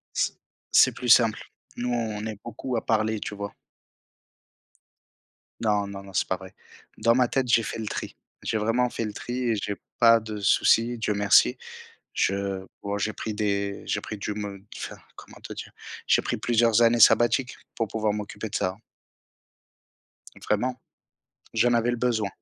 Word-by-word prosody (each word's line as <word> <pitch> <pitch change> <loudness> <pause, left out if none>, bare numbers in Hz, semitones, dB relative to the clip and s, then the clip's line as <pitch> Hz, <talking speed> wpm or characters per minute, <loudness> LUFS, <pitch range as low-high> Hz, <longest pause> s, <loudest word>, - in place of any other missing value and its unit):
C'est - - +1 0.4
c'est - - +7
plus 125 - -4
simple. 115 -2 +6 0.4
Nous, 125 0 -3
on 110 -3 -2
est 110 -2 -5
beaucoup 120 +2 -5
à - - -4
parler, 110 -1 +1
tu 105 - -5
vois? 100 0 -6 2.1
Non, 105 -2 +1
non, 100 0 -8
non, 95 -1 -13
c'est - - +1
pas 95 - -1
vrai. 95 -1 -12 0.4
Dans 115 +1 +3
ma 125 -1 +4
tête, 130 0 0
j'ai 115 -1 +4
fait 110 - -5
le 110 - -4
tri. - - -5 0.3
J'ai 110 - -1
vraiment 115 +3 +1
fait 115 - -3
le 105 - -5
tri 120 - -6 0.2
et 110 - +2
j'ai 100 0 -3 0.2
pas 115 -1 +7
de 110 -1 -6
soucis, 115 +4 +3
Dieu 105 -1 -1
merci. 100 -11 +4 0.6
Je 100 -1 -1 0.2
bon, 100 0 -2
j'ai 110 +2 -1
pris 110 -1 -5
des, 100 -1 -1
j'ai - - -1
pris 105 - -6
du 105 +1 -3
me 100 -2 -6
enfin, - - -6 0.2
comment - - -14
te - - -8
dire? - - -8 0.4
J'ai - - +4
pris - - -2
plusieurs 115 -1 +3
années 115 0 +4
sabbatiques 120 +4 +5 0.2
pour 115 - 0
pouvoir 110 0 -1
m'occuper 105 +1 -5
de 105 - -3
ça. 90 +1 -1 1.7
Vraiment. 125 +4 0 0.7
J'en 115 +2 +3
avais 120 +1 +2
le - - 0
besoin. 115 -4 0
110 Hz, 175 wpm, -26 LUFS, 100-115 Hz, 2.1 s, c'est